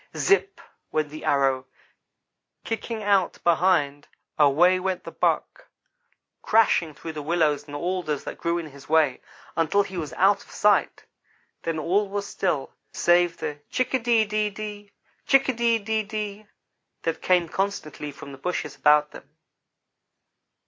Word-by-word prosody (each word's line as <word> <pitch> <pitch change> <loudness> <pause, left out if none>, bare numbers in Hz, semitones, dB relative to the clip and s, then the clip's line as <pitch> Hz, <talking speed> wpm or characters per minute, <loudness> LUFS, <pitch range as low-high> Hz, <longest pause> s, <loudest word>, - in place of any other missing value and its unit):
Zipp 395 0 +2 0.3
went 155 -1 0
the 155 +1 -9
arrow 135 -2 +2
and, 130 - -16 1.0
kicking 225 -1 -4
out 200 -2 +2
behind, 165 -5 +2 0.3
away 165 +6 +5
went 185 -1 -2
the - - -8
buck, - - -1 0.7
crashing 175 -8 +3
through 155 0 -6
willows 150 -2 +1
and 145 - -8
alders 170 -2 -2
that - - -7
grew 170 0 0
in 170 - -4
his 140 -2 -14
way, 155 -5 +3 0.3
until 165 +5 +2
he 190 -2 -8
was 155 -4 -4
out 195 +1 +3
of - - -22
sight. 210 0 +1 0.6
Then 165 -1 -2
all 190 +6 +1
was 200 0 -3
still, 155 -9 -2 0.2
save 175 0 +3
the 145 0 -5
chick 255 0 -1
a 260 - +3
de 230 -2 +3
de 210 0 0
de, 205 0 -8 0.4
chick 275 -1 +5
a - - +2
de 235 -1 +2
de 220 +1 -1
de, 210 0 -5 0.6
that 165 -1 -2
came 180 -2 +3
constantly 160 -6 -3
from 140 0 -11
the 135 - -11
bushes 180 +5 -3
about 150 0 +4
them. - - -13
180 Hz, 150 wpm, -25 LUFS, 150-205 Hz, 1.0 s, away